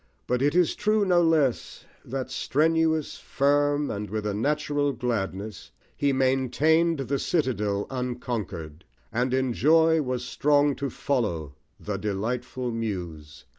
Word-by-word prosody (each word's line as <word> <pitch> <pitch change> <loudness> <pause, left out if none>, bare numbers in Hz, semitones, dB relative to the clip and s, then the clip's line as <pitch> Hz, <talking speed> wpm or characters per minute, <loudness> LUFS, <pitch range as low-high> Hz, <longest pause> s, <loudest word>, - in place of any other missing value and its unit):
But 125 0 0
it 145 +3 +2
is 180 -2 +3
true, 210 0 +1
no 180 -2 +4
less, 155 -7 +1 0.2
that 130 0 -5
strenuous, 160 +2 +1
firm, 145 +1 +1
And 105 0 -4
with 110 0 -3
a 105 - -1
natural 145 +4 0
gladness, 110 -4 -3 0.3
he 140 -1 +1
maintained 135 +5 +2
The 135 +1 -1
citadel 105 - 0
unconquered, 115 - -4 0.3
and 125 +2 0
in 130 -1 +1
joy 160 +4 +4
Was 125 -2 -3
strong 145 +2 +2
to 140 -1 -2
follow 110 - -2 0.3
the 105 -1 -4
delightful 120 +5 -3
Muse. 85 -10 -5
130 Hz, 130 wpm, -26 LUFS, 105-145 Hz, 0.3 s, no